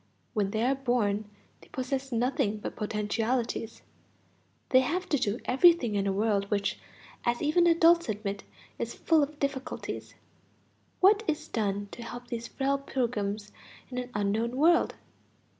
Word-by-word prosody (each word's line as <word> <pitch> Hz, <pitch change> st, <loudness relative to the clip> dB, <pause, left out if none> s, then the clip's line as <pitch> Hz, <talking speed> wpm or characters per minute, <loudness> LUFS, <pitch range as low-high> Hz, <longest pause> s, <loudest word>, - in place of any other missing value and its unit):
When 205 Hz, -4 st, +1 dB
they 220 Hz, +2 st, -1 dB
are 260 Hz, +3 st, +3 dB
born 225 Hz, -6 st, 0 dB, 0.3 s
they -, -, -16 dB
possess 265 Hz, +1 st, -3 dB
nothing 240 Hz, -2 st, +1 dB
but 210 Hz, -, -6 dB
potentialities; 225 Hz, +2 st, -2 dB, 0.9 s
they 255 Hz, -, +6 dB
have 330 Hz, +8 st, -1 dB
to 290 Hz, -, +2 dB
do 210 Hz, +2 st, 0 dB
everything 270 Hz, -4 st, +5 dB
in 200 Hz, -1 st, 0 dB
a -, -, +2 dB
world 200 Hz, 0 st, +1 dB
which, 200 Hz, -1 st, 0 dB, 0.4 s
as 240 Hz, 0 st, +1 dB
even 330 Hz, +4 st, +3 dB
adults 335 Hz, -2 st, +5 dB
admit, 200 Hz, -2 st, -3 dB, 0.4 s
is -, -, -3 dB
full 325 Hz, -2 st, +3 dB
of 290 Hz, +1 st, -2 dB
difficulties. 275 Hz, -2 st, -4 dB, 0.9 s
What 405 Hz, +3 st, +6 dB
is 310 Hz, 0 st, -1 dB
done 205 Hz, -3 st, -1 dB
to -, -, -9 dB
help 240 Hz, +1 st, -8 dB
these 235 Hz, 0 st, -4 dB
frail 275 Hz, 0 st, 0 dB
pilgrims 215 Hz, -6 st, -2 dB, 0.4 s
in 250 Hz, -, -2 dB
an 250 Hz, 0 st, -5 dB
unknown 215 Hz, +4 st, 0 dB
world? 335 Hz, +4 st, +4 dB
240 Hz, 145 wpm, -29 LUFS, 210-275 Hz, 0.9 s, they